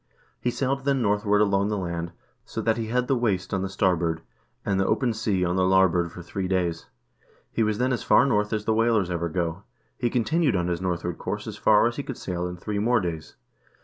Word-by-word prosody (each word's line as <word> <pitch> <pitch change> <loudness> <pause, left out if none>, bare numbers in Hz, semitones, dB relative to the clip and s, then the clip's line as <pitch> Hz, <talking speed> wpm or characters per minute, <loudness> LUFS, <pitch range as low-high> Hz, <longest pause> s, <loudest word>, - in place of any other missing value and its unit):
He 125 - 0
sailed 135 +2 -1
then 135 -2 +1
northward 105 0 +2
along 100 -1 +2
the 105 - -1
land, 85 -2 -3 0.3
so - - -6
that 115 -1 +2
he 115 -1 -3
had 125 +2 0
the 135 - +2
waste 105 -8 -1
on 95 - 0
the 95 - -2
star 95 -1 +2
board, 80 -1 -2 0.4
and 95 -1 +1
the 95 - +2
open 125 -4 +1
sea 105 -4 0
on 90 +1 0
the 95 - +3
larboard 90 -3 +3
for 85 - -9
three 95 +2 -3
days. 90 -3 -1 0.6
He - - -1
was 110 -1 +1
then 125 +2 +1
as 120 - -2
far 125 - +5
north 105 -5 +1
as 105 -1 -2
the 110 - +2
whalers 110 -5 +2
ever 85 -1 -1
go. 85 +1 -2 0.4
He 120 - +1
continued 130 +3 +1
on 90 -1 0
his 85 0 -2
north 90 -2 -2
ward 85 -1 -4
course - - -4
as - - -6
far 105 0 +4
as 120 0 -1
he - - -1
could 130 - -6
sail 90 -1 -3
in 90 0 -6
three 100 +4 -3
more 120 +3 +3
days. 85 -5 -5
100 Hz, 240 wpm, -25 LUFS, 90-115 Hz, 0.6 s, far